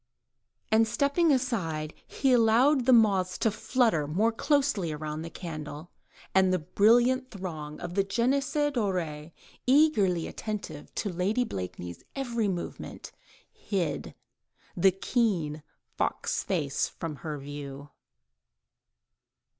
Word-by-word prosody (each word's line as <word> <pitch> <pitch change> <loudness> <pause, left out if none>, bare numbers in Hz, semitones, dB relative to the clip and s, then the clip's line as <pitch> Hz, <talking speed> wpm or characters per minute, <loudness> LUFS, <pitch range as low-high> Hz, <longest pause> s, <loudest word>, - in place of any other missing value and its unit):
And 220 +1 +5
stepping 280 +8 +2
aside, 170 - -1
he 270 -2 +1
allowed 245 +3 +4
the - - +7
moths 200 -6 +4
to 225 - +2
flutter 215 - +1
more 205 +10 +2
closely 270 - +1
round 155 +1 -5
the 165 - -6
candle, 155 -2 -7 0.4
and 190 -1 +4
the 185 - +3
brilliant 240 - +3
throng 160 -8 -6
of 175 0 -6
the 195 +1 +2
jeunesse 250 +8 0 0.2
dorée, 170 - -2 0.4
eagerly 250 - +4
attentive 200 -9 -6
to 200 -4 -2
Lady 200 +8 +1
Blakeney's 90 - -6
every 235 -5 -1
movement, 180 -3 -5 0.4
hid 185 -7 -3 0.6
the 190 +2 +5
keen, 185 -7 0 0.4
fox - - -1
like - - -14
face 140 -4 -1
from 160 -3 -6
her 150 +2 -5
view. 140 0 -8
195 Hz, 115 wpm, -28 LUFS, 155-240 Hz, 0.6 s, the